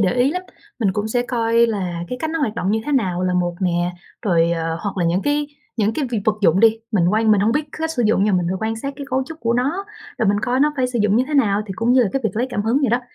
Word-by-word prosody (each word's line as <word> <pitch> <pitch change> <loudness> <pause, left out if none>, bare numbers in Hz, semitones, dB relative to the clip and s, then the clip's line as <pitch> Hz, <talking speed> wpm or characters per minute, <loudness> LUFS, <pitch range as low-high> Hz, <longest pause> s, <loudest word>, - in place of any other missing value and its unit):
để 190 -3 +2
ý 250 +3 +3
lắm. 365 +2 -3 0.4
Mình 200 -5 +1
cũng 210 +2 -2
sẽ 245 +2 +1
coi 230 -1 +3
là 180 -6 -3
cái 250 - -4
cách 315 - -2
nó 325 - -2
hoạt 235 -7 -1
động 190 -3 -1
như 220 +1 +1
thế 295 - -1
nào 185 -9 +1
là 180 0 0
một 175 -1 0
nè, 175 -1 0 0.3
rồi, 170 -5 +2
ờ, 165 -1 -2
hoặc 200 -2 -4
là 175 - 0
những 175 +3 +1
cái 290 0 0 0.3
những 215 0 +1
cái 295 - -1
việc 230 - 0
vật 215 -1 +1
dụng 185 +2 +4
đi, 225 0 +5
mình 175 -4 +3
quan 220 0 +3
mình 205 -2 +4
hổng 220 +3 +2
biết 300 +3 +1
c - - -9
cách 320 0 -1
sử 245 -7 -1
dụng 205 -2 +3
nha, 210 - +2
mình 180 -2 +1
phải 190 - -1
quan 225 - -2
sát 275 +5 -4
cái 280 - -7
cấu 265 +1 +1
trúc 325 0 -10
của 230 0 +1
nó, 290 +11 0 0.3
rồi 220 - +2
mình 205 0 +2
coi 255 +2 0
nó 300 +1 +3
phải 255 -1 +1
sử 245 -2 -3
dụng 210 +1 +3
như 255 - +3
thế 300 - -4
nào. 210 -6 +3
Thì 190 - -5
cũng 235 +2 +2
như 255 -1 +5
là 210 - +1
cái 270 - 0
việc - - +2
lấy 245 +3 +1
cảm 205 - -1
hứng 230 +5 +2
vậy 270 - +2
đó, 240 - +2
225 Hz, 325 wpm, -20 LUFS, 195-255 Hz, 0.4 s, đi